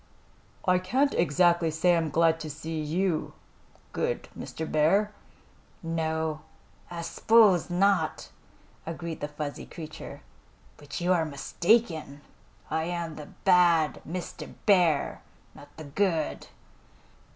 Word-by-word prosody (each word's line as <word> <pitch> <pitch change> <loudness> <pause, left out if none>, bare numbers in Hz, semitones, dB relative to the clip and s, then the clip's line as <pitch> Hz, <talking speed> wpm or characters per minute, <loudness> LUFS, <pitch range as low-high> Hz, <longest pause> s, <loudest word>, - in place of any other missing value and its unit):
"I 180 0 +4
can't 260 +10 +1
exactly 170 +1 +3
say 165 +3 +3
I'm 165 -2 0
glad 165 +1 +3
to 155 - -6
see 160 +2 -5
you, 165 +2 -1 0.6
good 485 +1 -2
Mr. 160 - -6
Bear." 170 +8 +2 0.7
"No, 160 -1 -2 0.5
I 170 -1 -5
s'pose 205 -1 +4
not," 195 +2 +1 0.6
agreed 165 0 -5
the 145 - -2
fuzzy 150 -1 -6
creature. 155 -2 -9 0.6
"But 145 +3 -7
you 180 +1 +3
are 170 -2 +2
mistaken. 160 +1 0 0.5
I 160 +1 0
am 170 -2 -3
the 150 -1 -9 0.2
Bad 175 -4 +4
Mr. 175 +2 -7
Bear, 175 -8 +3 0.3
not 145 - -14
the 160 - -8
Good." 160 +1 -1
165 Hz, 115 wpm, -28 LUFS, 155-180 Hz, 0.7 s, I